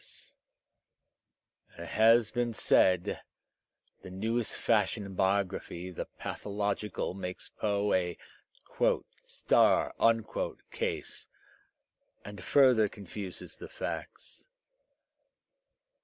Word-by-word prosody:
As 85 0 -7
has 115 0 +5
been 120 -2 -1
said, 90 -4 +3 0.8
the - - -10
newest 110 +5 -1
fashion 110 -1 +1
in 100 - -8
biography, 95 -2 -1
the 90 - -5
pathological, 100 -1 -3
makes 90 -1 -6
Poe 105 -1 0
a 90 -2 0 1.1
"star'* - - +3 0.8
case - - -3 1.0
and 100 -1 -8
further 125 -7 +5
confuses 100 -1 -7
the - - -8
facts. - - -7
100 Hz, 80 wpm, -31 LUFS, 95-110 Hz, 1.1 s, has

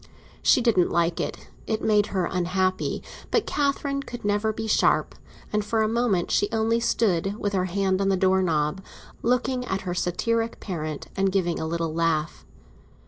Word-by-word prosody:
She 255 - +4
didn't 220 -7 +3
like 170 0 +1
it—it 220 -1 -4
made 210 -1 +3
her 185 -3 -1
unhappy. 185 +1 -1 0.3
But - - +1
Catherine 280 -1 0
could 240 -5 -8
never 205 +1 +1
be 220 +1 -5
sharp; 220 - +2 0.4
and 210 0 +1
for 220 +1 +1
a - - +2
moment 225 -6 +1
she 205 - +2
only 225 +1 +1
stood, 200 -4 +1
with 205 -1 -2
her 185 -1 +1
hand 190 +1 0
on 195 - +2
the 190 - +2
door 190 0 +3
knob, 160 0 0 0.4
looking 250 +1 +1
at 195 -5 -2
her 180 -2 -3
satiric 225 +6 -1
parent, 155 -6 -5
and 195 0 +1
giving 180 -3 0
a 160 - -2
little 165 -1 -2
laugh. 165 -1 -1
195 Hz, 170 wpm, -25 LUFS, 175-225 Hz, 0.4 s, She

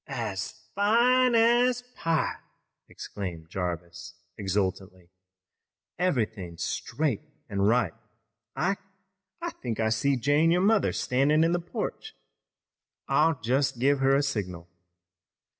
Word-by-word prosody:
"As 110 -8 -3 0.2
fine 240 +5 +4
as 240 +2 +4
pie!" 165 -2 0 0.5
exclaimed 85 -5 -7
Jarvis 90 -1 -5 0.2
exultantly. 95 -2 -3 0.9
"Everythin's 110 - -1
straight 145 - -2 0.3
an' 100 -3 -2
right. 105 -3 +2 0.6
Ike, 195 +2 0 0.6
I 345 - -2
think 120 -3 -5
I 110 -1 +2
see 135 +6 +1
Jane, 145 +6 +3
your 175 +2 +3
mother, 210 +2 +3
standin' 145 +5 +2
in 165 - +2
the 175 - +1
porch. 225 - -5 0.9
I'll 155 -2 +3
just 135 +3 +1
give 140 +3 +2
her 135 +1 +4
a 140 - +2
signal." 90 -11 -3
135 Hz, 110 wpm, -27 LUFS, -, 0.9 s, fine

